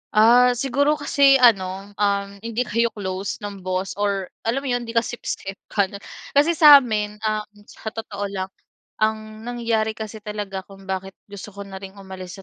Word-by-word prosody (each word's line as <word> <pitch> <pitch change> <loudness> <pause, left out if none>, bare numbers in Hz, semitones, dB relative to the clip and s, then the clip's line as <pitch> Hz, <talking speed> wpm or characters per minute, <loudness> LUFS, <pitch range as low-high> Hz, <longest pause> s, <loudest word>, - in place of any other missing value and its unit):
Ah, 245 +3 +6
siguro 280 +4 +1
kasi 280 -2 +4
ano, 200 -5 +3
um, 200 -1 0
hindi 230 +3 -2
kayo 235 0 +1
close 195 0 -4
ng 200 -1 -6
boss, 185 +1 -2
or 200 -2 -1 0.2
alam 270 +4 0
mo - - -4
yun, 245 -1 -1
'di 230 - -7
ka 230 - +4
sip-sip 195 -4 -5
paanong 200 -1 -1 0.3
kasi 305 +4 +3
sa'min, 230 -9 +6
ah, 215 0 0 0.2
sa 220 - -7
totoo 205 -3 -6
lang, 190 -1 -3 0.5
ang 215 +1 -2
nangyari 230 -2 -1
kasi 220 0 -7
talaga 205 -3 -5
kung 195 -1 -14
bakit 190 0 -4 0.2
gusto 200 0 -9
ko 200 - -7
na 195 -1 -8
ring 195 0 -10
umalis 190 -2 -9
210 Hz, 170 wpm, -22 LUFS, 195-235 Hz, 0.5 s, Ah